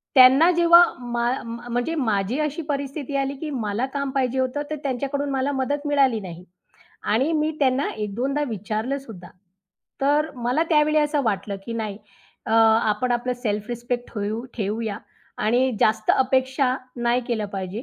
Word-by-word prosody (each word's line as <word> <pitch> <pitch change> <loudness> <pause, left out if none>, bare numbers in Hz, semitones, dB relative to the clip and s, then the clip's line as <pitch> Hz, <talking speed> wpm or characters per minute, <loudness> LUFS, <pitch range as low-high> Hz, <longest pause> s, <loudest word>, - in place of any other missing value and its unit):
त्यांना 265 +6 +8
जेव्हा 340 0 +7 0.2
मा 240 -1 -1
म्हणजे 240 +5 -3
माझी 220 -3 0
अशी 305 +2 -1
परिस्थिती 280 0 -3
आली, 275 0 -1
की 305 +2 -5
मला 230 -3 -2
काम 280 -1 -1
पाहिजे 260 -1 0
होतं, 260 +2 -1
तर 310 - -2
त्यांच्याकडून 280 +2 -2
मला 270 +1 0
मदत 285 +2 -2
मिळाली 275 -5 +3
नाही. 180 -3 -9 0.6
आणि 260 +10 +1
मी 310 0 +1
त्यांना 265 0 +2
एक 210 -2 -5
दोनदा 275 +6 -1
विचारलंसुद्धा. 220 -1 -4 0.7
तर 295 +3 +2
मला 245 +5 0
त्यावेळी 305 0 +4
असं 295 -1 +1
वाटलं 205 -2 -1
की 230 - -5
नाही, 215 -3 -4 0.5
अ, 220 - -2
आपण 225 +2 +3
आपलं 245 +1 -1
सेल्फ 210 -2 -2
रिस्पेक्ट 240 0 -4
ठेऊ 215 +2 -3
ठेऊया 215 0 -2 0.4
आणि 245 +5 +2
जास्त 220 0 +2
अपेक्षा 260 0 +1 0.2
नाही 240 +1 +1
केलं 220 -3 -1
पाहिजे 195 +3 -4
250 Hz, 150 wpm, -23 LUFS, 220-280 Hz, 0.7 s, त्यांना